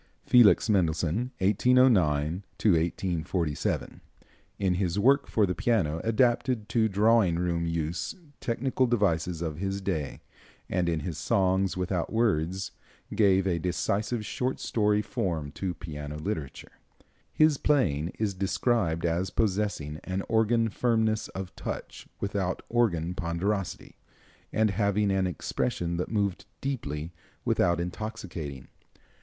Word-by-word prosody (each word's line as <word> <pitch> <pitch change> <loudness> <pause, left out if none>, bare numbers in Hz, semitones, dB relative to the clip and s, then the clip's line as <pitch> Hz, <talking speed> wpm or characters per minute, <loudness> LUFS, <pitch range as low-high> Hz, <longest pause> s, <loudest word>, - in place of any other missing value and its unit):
Felix 120 -3 +6
Mendelssohn 90 +3 +1
(1809 95 - +3
1847), 85 -3 0 0.6
in 95 -2 +1
his 90 0 -1
work 135 +7 +4
for 105 - +2
the 90 - -1
piano, 85 -9 0
adapted 120 0 +1
to 115 -2 +3
drawing 105 -2 +3
room 85 -1 0
use 85 - -2 0.2
technical 130 +2 0
devices 90 -7 +1
of 80 -3 -3
his 95 +1 -2
day, 85 -7 -3 0.5
and 90 -1 0
in 80 -2 -1
his 75 -1 -4
"Songs 95 +2 +1
without 90 -1 -1
Words" 95 -5 0 0.4
gave 95 -3 +4
a 90 -3 +1
decisive 105 +6 -1
short 130 +4 -2
story 105 -1 +1
form 80 -9 -2
to 90 +2 -4
piano 75 -2 -6
literature. 80 -5 -5 0.5
His 155 -2 +3
playing 85 - +2
is 105 -2 0
described 95 -2 0
as 85 +2 0
possessing 95 -8 -1
an 95 +1 -3
organ 115 +1 +2
firmness 110 -1 +1
of 95 -1 -7
touch - - -6
without 100 -2 -2
organ 90 -8 +1
ponderosity, 95 +2 -3 0.5
and 110 -1 +2
having 100 0 +1
an 95 -1 +1
expression 85 -1 -2
that 90 - -2
moved 100 -4 -1
deeply 85 - -4 0.3
without 85 0 +2
intoxicating. 85 - -5
95 Hz, 120 wpm, -28 LUFS, 85-110 Hz, 0.6 s, Felix